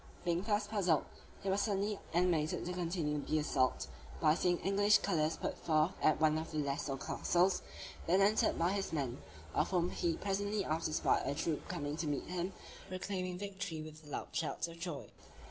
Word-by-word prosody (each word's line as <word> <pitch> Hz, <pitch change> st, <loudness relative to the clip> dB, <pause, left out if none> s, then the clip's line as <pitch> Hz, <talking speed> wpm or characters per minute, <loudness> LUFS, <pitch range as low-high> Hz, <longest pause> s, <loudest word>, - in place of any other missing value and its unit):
Being 170 Hz, 0 st, +2 dB
thus 205 Hz, 0 st, +1 dB
puzzled, 195 Hz, -7 st, +2 dB, 0.4 s
he 195 Hz, -, -1 dB
was 200 Hz, +1 st, +2 dB
suddenly 205 Hz, -1 st, 0 dB
animated 170 Hz, -3 st, +2 dB
to 180 Hz, -, -2 dB
continue 165 Hz, -4 st, -1 dB
the 155 Hz, -, 0 dB
assault, 135 Hz, -4 st, +1 dB, 0.3 s
by 150 Hz, -, +5 dB
seeing 175 Hz, +1 st, +2 dB
the -, -, -13 dB
English 205 Hz, +2 st, +5 dB
colors 160 Hz, -5 st, +1 dB
put -, -, -2 dB
forth 155 Hz, +1 st, +3 dB
at 155 Hz, -, +4 dB
one 155 Hz, 0 st, +4 dB
of 160 Hz, +1 st, -5 dB
the 155 Hz, -, -4 dB
lesser 140 Hz, -1 st, -1 dB
castles, 180 Hz, +6 st, +2 dB, 0.5 s
then 180 Hz, +3 st, +4 dB
entered 205 Hz, +2 st, +4 dB
by 170 Hz, +2 st, +2 dB
his 200 Hz, -1 st, -1 dB
men; 135 Hz, -5 st, -2 dB, 0.3 s
of -, -, +2 dB
whom 180 Hz, -2 st, +1 dB
he 170 Hz, -2 st, 0 dB
presently 205 Hz, +1 st, -1 dB
after 155 Hz, +1 st, 0 dB
spied -, -, +2 dB
a 140 Hz, -, 0 dB
troop 160 Hz, 0 st, -2 dB
coming 145 Hz, +1 st, -3 dB
to 165 Hz, -, -2 dB
meet 145 Hz, -2 st, -1 dB
him, 180 Hz, +1 st, -2 dB, 0.4 s
proclaiming 185 Hz, -1 st, -3 dB
victory 190 Hz, -5 st, -4 dB
with 155 Hz, 0 st, -10 dB
loud 145 Hz, -, -4 dB
shouts 165 Hz, +1 st, -1 dB
of 170 Hz, 0 st, -10 dB
joy. 170 Hz, -5 st, -4 dB
170 Hz, 185 wpm, -35 LUFS, 155-195 Hz, 0.5 s, by